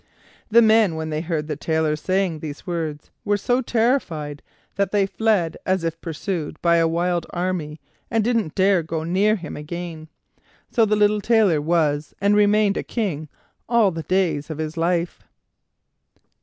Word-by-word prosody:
The 230 Hz, +2 st, +6 dB
men, 220 Hz, -5 st, +4 dB
when 160 Hz, 0 st, -4 dB
they 155 Hz, 0 st, -1 dB
heard 160 Hz, -3 st, -2 dB
the 150 Hz, -1 st, -3 dB
Tailor 160 Hz, 0 st, 0 dB
saying 185 Hz, 0 st, -1 dB
these 150 Hz, -2 st, -7 dB
words, 160 Hz, -4 st, -4 dB
were 205 Hz, 0 st, +1 dB
so 245 Hz, +5 st, +1 dB
terrified 220 Hz, -, -1 dB, 0.3 s
that 200 Hz, -1 st, 0 dB
they 205 Hz, -2 st, +3 dB
fled 195 Hz, -5 st, 0 dB
as 185 Hz, -2 st, 0 dB
if 165 Hz, 0 st, -3 dB
pursued 165 Hz, -1 st, -4 dB
by 170 Hz, -1 st, +3 dB
a 165 Hz, 0 st, +3 dB
wild 170 Hz, +1 st, -1 dB
army, 175 Hz, -4 st, -3 dB, 0.3 s
and 225 Hz, -1 st, +1 dB
didn't 225 Hz, -8 st, 0 dB
dare 190 Hz, -1 st, +3 dB
go 160 Hz, 0 st, -4 dB
near 195 Hz, +6 st, +2 dB
him 175 Hz, -7 st, -7 dB
again. 160 Hz, +1 st, -7 dB, 0.6 s
So 230 Hz, -, +4 dB
the 210 Hz, 0 st, +2 dB
little 210 Hz, 0 st, +3 dB
Tailor 205 Hz, -8 st, +3 dB
was 150 Hz, -2 st, 0 dB
and 200 Hz, +1 st, +3 dB
remained 210 Hz, 0 st, +3 dB
a -, -, -2 dB
King 165 Hz, -10 st, -3 dB, 0.4 s
all 230 Hz, -5 st, +4 dB
the 165 Hz, -1 st, -5 dB
days 160 Hz, -3 st, 0 dB
of 155 Hz, -, -5 dB
his 155 Hz, 0 st, -4 dB
life. 170 Hz, +1 st, -1 dB
175 Hz, 165 wpm, -22 LUFS, 160-205 Hz, 0.6 s, The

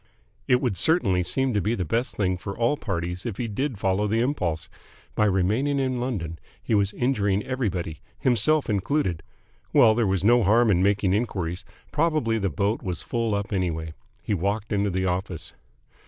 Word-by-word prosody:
It 125 Hz, -1 st, +4 dB
would 120 Hz, -8 st, -1 dB
certainly 100 Hz, -, +3 dB
seem 125 Hz, +9 st, 0 dB
to 105 Hz, -, +1 dB
be 110 Hz, +5 st, 0 dB
the 90 Hz, -, -2 dB
best 115 Hz, +10 st, -1 dB
thing 95 Hz, -3 st, +1 dB
for 100 Hz, +2 st, -7 dB
all 120 Hz, +5 st, +2 dB
parties 90 Hz, -, -4 dB
if 110 Hz, -5 st, -4 dB
he 120 Hz, -, -2 dB
did 125 Hz, +3 st, -2 dB
follow 95 Hz, +2 st, +1 dB
the 110 Hz, +2 st, +1 dB
impulse. 90 Hz, -, -1 dB, 0.5 s
By 105 Hz, -, +2 dB
remaining 105 Hz, +9 st, +1 dB
in 130 Hz, -2 st, 0 dB
London 90 Hz, -11 st, -3 dB, 0.2 s
he -, -, -3 dB
was 100 Hz, -1 st, +2 dB
injuring 105 Hz, -6 st, +1 dB
everybody, 95 Hz, -, -3 dB, 0.2 s
himself 130 Hz, +5 st, +2 dB
included.... 100 Hz, -, 0 dB, 0.5 s
Well, 110 Hz, -, +6 dB
there 115 Hz, -1 st, +1 dB
was 95 Hz, -1 st, 0 dB
no 120 Hz, +3 st, +5 dB
harm 110 Hz, +3 st, +4 dB
in 90 Hz, -2 st, +3 dB
making 100 Hz, -1 st, +2 dB
enquiries. 95 Hz, -5 st, -2 dB, 0.3 s
Probably 150 Hz, -8 st, +1 dB
the 100 Hz, -2 st, 0 dB
boat 100 Hz, +9 st, -1 dB
was 90 Hz, -3 st, -4 dB
full 115 Hz, -3 st, -1 dB
up 100 Hz, 0 st, -3 dB
anyway.... 80 Hz, -4 st, -2 dB, 0.3 s
He -, -, -1 dB
walked 100 Hz, +4 st, -1 dB
into 100 Hz, 0 st, +1 dB
the 95 Hz, 0 st, -1 dB
office. 90 Hz, -2 st, -3 dB
105 Hz, 180 wpm, -25 LUFS, 95-120 Hz, 0.5 s, Well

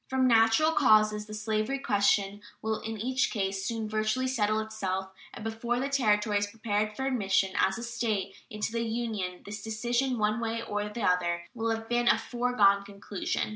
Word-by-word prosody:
From 260 Hz, -1 st, +2 dB
natural 225 Hz, +6 st, +5 dB
causes 215 Hz, -7 st, +4 dB
the 215 Hz, -, -8 dB
slavery 215 Hz, +4 st, -1 dB
question 205 Hz, -4 st, +1 dB, 0.2 s
will 220 Hz, 0 st, -2 dB
in 225 Hz, 0 st, -5 dB
each 255 Hz, +4 st, 0 dB
case 195 Hz, -2 st, -2 dB
soon 225 Hz, +1 st, -2 dB
virtually 215 Hz, +4 st, 0 dB
settle 215 Hz, -4 st, +1 dB
itself, 190 Hz, -3 st, -3 dB, 0.2 s
and 230 Hz, -, -9 dB
before 230 Hz, +2 st, -2 dB
the 275 Hz, +2 st, -1 dB
Territory 210 Hz, -6 st, +2 dB
is 205 Hz, -, -1 dB
prepared 215 Hz, -1 st, -2 dB
for 265 Hz, -, -3 dB
admission 195 Hz, -7 st, +1 dB
as 190 Hz, +2 st, +2 dB
a 235 Hz, -, -6 dB
State 230 Hz, -5 st, -2 dB, 0.2 s
into 210 Hz, 0 st, -3 dB
the 230 Hz, 0 st, -1 dB
Union 220 Hz, -6 st, -3 dB
this 205 Hz, +1 st, -6 dB
decision, 240 Hz, +4 st, -1 dB
one 215 Hz, +1 st, +1 dB
way 230 Hz, 0 st, -2 dB
or 210 Hz, -1 st, -3 dB
the 225 Hz, +1 st, -5 dB
other, 175 Hz, -2 st, +1 dB
will 230 Hz, -2 st, -2 dB
have 225 Hz, 0 st, -2 dB
been 240 Hz, 0 st, +1 dB
a -, -, +6 dB
foregone 235 Hz, -5 st, +2 dB
conclusion. 200 Hz, 0 st, -3 dB
220 Hz, 180 wpm, -29 LUFS, 205-235 Hz, 0.2 s, a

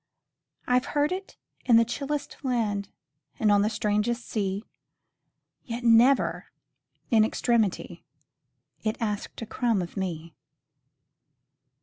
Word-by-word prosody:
I 250 Hz, 0 st, +4 dB
've 255 Hz, -, -11 dB
heard 295 Hz, +3 st, +3 dB
it 380 Hz, +1 st, -5 dB, 0.3 s
in 235 Hz, -3 st, +6 dB
the 230 Hz, -, +5 dB
chillest 285 Hz, +4 st, -4 dB
land, 220 Hz, -7 st, -1 dB, 0.5 s
And 215 Hz, -2 st, +3 dB
on 205 Hz, 0 st, +5 dB
the 210 Hz, -, +2 dB
strangest 220 Hz, +2 st, -1 dB
sea; 200 Hz, -1 st, -2 dB, 1.0 s
Yet, 235 Hz, 0 st, -5 dB
never, 240 Hz, +3 st, +4 dB, 0.6 s
in 220 Hz, -2 st, +6 dB
extremity, 220 Hz, -3 st, 0 dB, 0.8 s
It 220 Hz, +2 st, -1 dB
asked 210 Hz, 0 st, -3 dB
a -, -, -5 dB
crumb 230 Hz, -1 st, 0 dB
of 175 Hz, -2 st, -5 dB
me. 170 Hz, -4 st, -4 dB
225 Hz, 115 wpm, -27 LUFS, 205-245 Hz, 1.0 s, in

